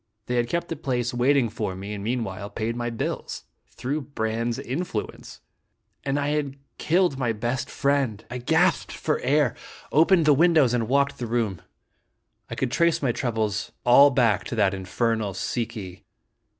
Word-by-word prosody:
They 125 - -3
had 120 0 +1
kept 170 +3 -2
the 165 - -2
place'waiting 125 0 +1
for 105 -3 -4
me, 100 +3 -6
and 100 -1 -6
meanwhile 105 -4 -3
paid 115 +1 -3
my 120 0 -2
bills. 115 -2 -4 0.3
Through 145 +5 -3
Brande's 115 -3 -2
influence! 130 -4 -5 0.6
And 140 +1 0
I 145 0 0
had 145 -2 -1 0.2
killed 170 -4 +2
my 120 -3 0
best 120 +4 -2
friend! 140 -7 0
I 125 - -4
gasped 160 +8 +2
for 155 - -1
air, 135 -1 +2 0.4
opened 165 +2 +4
the 150 - +6
windows 155 -4 +4
and 115 -2 0
walked 140 +2 +1
the 120 - -3
room. 110 -6 -1 0.9
I - - -5
could 130 -2 -1
trace 170 +1 +2
my 130 - +3
troubles 110 -4 -2
all 140 +4 +8
back 115 -7 +2
to - - -4
that 105 -3 +2
infernal 100 +2 -1
Si 115 +3 -2
ki. 95 -5 -9
120 Hz, 165 wpm, -25 LUFS, 110-140 Hz, 0.9 s, all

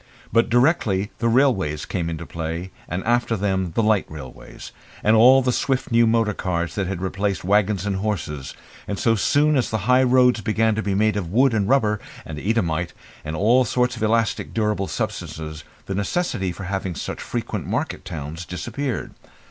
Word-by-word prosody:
But 115 +1 +3
directly 115 - +2
the 115 - +1
railways 115 - +2
came 85 -3 -2
into 85 0 -5
play, 85 +3 -5 0.2
and 90 +3 -3
after 120 -1 +1
them 95 -3 -1
the 115 - +2
light 105 -2 +2
railways, 70 -5 -10 0.3
and 110 +2 +4
all 130 +4 +7
the 125 - +2
swift 130 +1 -1
new 115 0 +5
motor 110 -2 +2
cars 85 -3 -2
that 95 +1 -2
had 95 -1 -4
replaced 95 0 -1
waggons 100 0 +2
and 100 -2 -1
horses, 90 -9 -3 0.3
and 100 - -3
so 115 - +2
soon 145 +8 +3
as 130 - +1
the 110 - 0
high 125 +1 +5
roads 125 -2 +4
began 110 +2 +1
to 110 - -1
be 100 -1 -1
made 105 +1 +2
of 90 -5 -3
wood, 130 +4 +4
and 105 -2 0
rubber, 110 -6 +2 0.3
and 75 -1 -6
Eadhamite, 90 -4 -1 0.3
and 80 +1 -4
all 115 +9 +4
sorts 125 0 0
of 115 - -9
elastic 115 +1 0
durable 105 -3 0
substances 80 -3 -5 0.2
the 95 - -4
necessity 100 - -1
of 90 - -7
having 95 -2 -3
such - - -5
frequent - - -4
market - - -2
towns 80 +2 -6
disappeared. 125 +9 -4
105 Hz, 180 wpm, -22 LUFS, 90-115 Hz, 0.3 s, all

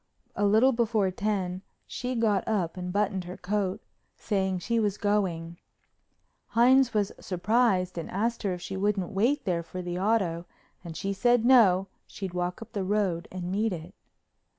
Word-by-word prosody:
A 205 - +2
little 220 +6 +5
before 225 -5 +1
ten 190 -2 -2 0.2
she 250 +1 -4
got 215 -4 +1
up 190 -7 0
and 180 -1 -5
buttoned 195 -2 0
her 180 +1 -7
coat, 200 +1 -2 0.3
saying 190 -3 -1
she 230 +6 -1
was 210 -2 0
going. 175 -5 -1 0.9
Hines 250 +2 +4
was 205 -2 +1
surprised 185 -2 +1
and 165 - -6
asked 230 +5 -1
her 200 - -1
if 175 - -10
she 195 - -5
wouldn't 195 -2 0
wait 235 +9 +1
there 175 -3 0
for 180 +2 -7
the 175 0 -3
auto, 185 -5 0 0.4
and 165 -3 -7
she 195 0 -2
said 240 +3 +2
no, 205 -8 +6 0.2
she'd 190 -3 -6
walk 180 +3 -3
up 225 - -18
the 200 - -2
road 190 -4 0
and 180 -1 -5
meet 210 +1 0
it. 170 +2 -8
195 Hz, 170 wpm, -28 LUFS, 180-220 Hz, 0.9 s, no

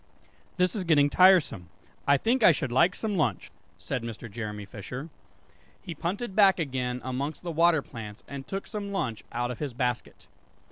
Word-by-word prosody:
"This 180 +1 +2
is 200 - -2
getting 145 -4 +4
tiresome, 175 - +4 0.4
I 140 0 +6
think 235 - +1
I 210 - +8
should 135 -5 -2
like 170 +9 +4
some 210 -3 -2
lunch," 120 - -1 0.3
said 125 - -3
Mr. 115 -1 -7
Jeremy 105 -2 -5
Fisher. 120 - -7 0.7
He 170 - -7
punted 190 +7 -4
back 195 -3 +6
again 130 -5 -2
amongst 135 +6 -4
the 175 - -3
water 165 -2 +3
plants, 105 -4 -9
and 140 -1 -7
took 195 0 -4
some 205 -2 -5
lunch 125 - -2
out 120 +1 -2
of 120 - -7
his 140 -5 -4
basket. 125 -2 -3
140 Hz, 175 wpm, -28 LUFS, 120-180 Hz, 0.7 s, I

